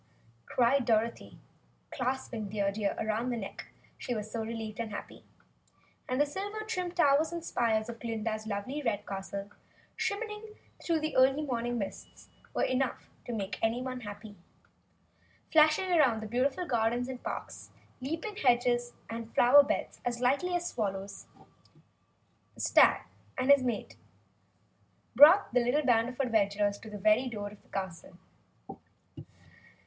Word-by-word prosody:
cried 255 Hz, +2 st, +3 dB
Dorothy, 230 Hz, 0 st, 0 dB, 0.5 s
clasping 250 Hz, -5 st, -3 dB
Dear 200 Hz, -1 st, 0 dB
Deer 205 Hz, 0 st, -1 dB
around 220 Hz, +3 st, -1 dB
the 240 Hz, -, -2 dB
neck 195 Hz, -3 st, -7 dB, 0.3 s
she 245 Hz, -, -3 dB
was 215 Hz, 0 st, -5 dB
so 230 Hz, -, -3 dB
relieved 220 Hz, -1 st, -6 dB
and 230 Hz, -1 st, -3 dB
happy. 205 Hz, -, -8 dB, 0.9 s
And 255 Hz, +1 st, 0 dB
the 290 Hz, -, +5 dB
silver 405 Hz, +8 st, -5 dB
trimmed 365 Hz, -5 st, -3 dB
towers 310 Hz, 0 st, +4 dB
and 340 Hz, -1 st, -5 dB
spires 220 Hz, -5 st, 0 dB
of 235 Hz, -1 st, -7 dB
Glinda's 220 Hz, -1 st, -3 dB
lovely, 220 Hz, +8 st, -3 dB
red 230 Hz, -7 st, -1 dB
castle, 195 Hz, +1 st, -6 dB, 0.4 s
shimmering 425 Hz, +1 st, -4 dB, 0.3 s
through 330 Hz, -2 st, +1 dB
the 310 Hz, 0 st, -3 dB
early 270 Hz, +3 st, +4 dB
morning 240 Hz, -3 st, -2 dB
mists, 195 Hz, -4 st, -7 dB, 0.2 s
were -, -, -1 dB
enough 255 Hz, 0 st, -1 dB, 0.2 s
to -, -, -5 dB
make 200 Hz, -4 st, -4 dB
anyone 250 Hz, +3 st, -1 dB
happy. 205 Hz, -1 st, -9 dB, 1.2 s
Flashing 310 Hz, +3 st, +5 dB
through 300 Hz, -11 st, +3 dB
the 220 Hz, -, -6 dB
beautiful 260 Hz, -, 0 dB
gardens 240 Hz, -2 st, 0 dB
and 260 Hz, -1 st, -6 dB
parks, -, -, -6 dB, 0.3 s
leaping 325 Hz, +10 st, -4 dB
hedges 240 Hz, -1 st, +2 dB
and 230 Hz, 0 st, -6 dB
flower 265 Hz, +4 st, +8 dB
beds 280 Hz, -, -3 dB
as 240 Hz, -1 st, -2 dB
lightly 280 Hz, +9 st, +1 dB
as 350 Hz, 0 st, -1 dB
swallows, 195 Hz, -, -4 dB, 1.3 s
the -, -, -16 dB
stag -, -, +5 dB, 0.3 s
and 260 Hz, +2 st, +3 dB
his 280 Hz, -1 st, +7 dB
mate 245 Hz, -4 st, -3 dB, 1.2 s
brought 310 Hz, -, +8 dB
the 250 Hz, -, +5 dB
little 275 Hz, +5 st, +1 dB
band 235 Hz, -1 st, +3 dB
of 250 Hz, -, -11 dB
adventurers 205 Hz, -5 st, +1 dB
to 220 Hz, -, -10 dB
the 210 Hz, -, -7 dB
very 215 Hz, +5 st, +3 dB
door 205 Hz, -3 st, -5 dB
of 205 Hz, 0 st, -15 dB
the -, -, -28 dB
castle. 185 Hz, -2 st, -6 dB
240 Hz, 145 wpm, -30 LUFS, 215-280 Hz, 1.3 s, flower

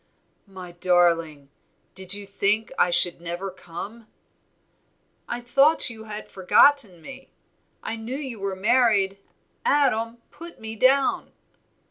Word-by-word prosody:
"My 185 Hz, -2 st, -10 dB
darling! 170 Hz, -5 st, +1 dB, 0.4 s
did 190 Hz, -1 st, -8 dB
you 205 Hz, 0 st, -9 dB
think 205 Hz, +4 st, 0 dB
I -, -, +4 dB
should 175 Hz, 0 st, +3 dB
never 175 Hz, +3 st, -5 dB
come?" 200 Hz, +6 st, -10 dB, 1.2 s
"I 240 Hz, -, -4 dB
thought 275 Hz, +3 st, +3 dB
you 220 Hz, -1 st, -11 dB
had 215 Hz, 0 st, -7 dB
forgotten 190 Hz, -, +2 dB
me, 270 Hz, 0 st, -11 dB, 0.5 s
I 225 Hz, -, -4 dB
knew 225 Hz, +4 st, -6 dB
you 265 Hz, -7 st, -7 dB
were 195 Hz, -1 st, -3 dB
married. 200 Hz, -2 st, +2 dB, 0.4 s
Adam, 235 Hz, -5 st, +1 dB
put 335 Hz, +1 st, -11 dB
me 220 Hz, 0 st, -7 dB
down." 265 Hz, +4 st, +2 dB
210 Hz, 120 wpm, -24 LUFS, 180-245 Hz, 1.2 s, I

